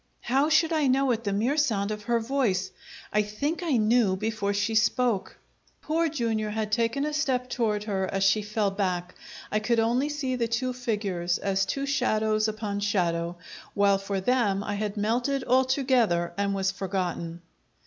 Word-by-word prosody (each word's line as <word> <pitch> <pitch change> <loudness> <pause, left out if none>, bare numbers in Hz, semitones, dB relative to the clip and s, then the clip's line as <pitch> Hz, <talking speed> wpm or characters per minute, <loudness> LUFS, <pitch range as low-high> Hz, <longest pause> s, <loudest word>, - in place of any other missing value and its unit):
How 270 +5 +2
should 320 +1 +3
I 305 -3 +2
know 265 0 +3
at 230 -1 -2
the 200 - 0
mere 230 +9 0
sound 215 -9 +1
of 210 -1 -5
her 235 -1 +2
voice? 225 -6 0 0.4
I 210 - +4
think 280 - -3
I 320 -8 +1
knew 215 -3 +3
before 215 0 -2
she 205 +2 0
spoke! 230 -1 +1 0.5
Poor 325 +1 +1
Jr. 230 -7 -1
had 210 0 -3
taken 235 +5 +1
a 300 - -3
step 260 -5 -1
toward 215 -4 0
her 195 -3 -2
as 195 0 0
she 195 +2 +4
fell 210 -1 -1
back; 185 -2 -2 0.4
I 215 - +2
could 230 +2 +1
only 240 +6 +1
see 280 -3 -2
the 235 -2 0
two 255 +3 -1
figures 205 -8 -1
as 195 -1 0
two 275 0 -2
shadows 220 -6 +1
upon 215 -2 -3
shadow, 175 -4 0 0.4
while 200 -1 +3
for 195 0 -3
them 205 -2 +1
I 205 - -3
had 210 0 -3
melted 245 +6 0
altogether 255 -9 +2
and 200 0 0
was 195 0 0
forgotten. 180 -3 -3
215 Hz, 175 wpm, -27 LUFS, 200-255 Hz, 0.5 s, I